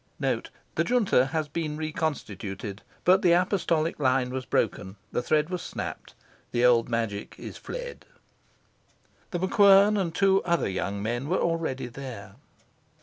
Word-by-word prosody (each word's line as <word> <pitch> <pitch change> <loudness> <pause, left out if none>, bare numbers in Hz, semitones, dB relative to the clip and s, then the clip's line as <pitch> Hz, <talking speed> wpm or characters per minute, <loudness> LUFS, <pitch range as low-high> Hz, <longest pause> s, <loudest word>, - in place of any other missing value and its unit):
The - - -2
Junta 215 - +3
has 155 +1 -2
been 150 0 -3
reconstituted. 110 - -4 0.2
But 185 +2 +5
the 175 -2 +5
apostolic 170 -3 +1
line 130 -2 +2
was 130 -1 -4
broken, 95 -2 -1 0.2
the - - 0
thread 155 +5 +1
was 180 -2 -2
snapped; - - -6 0.4
the 120 0 +2
old 120 -1 +4
magic 115 -3 -2
is - - -8
fled. - - -7 1.2
The 175 - -2
MacQuern 200 +2 +5
and 170 -3 -2
two 195 0 +4
other 170 -1 +1
young 100 +1 -3
men 120 +6 -2
were 185 - +2
already 165 -6 -1
there. 120 -5 -8
155 Hz, 140 wpm, -27 LUFS, 120-180 Hz, 1.2 s, But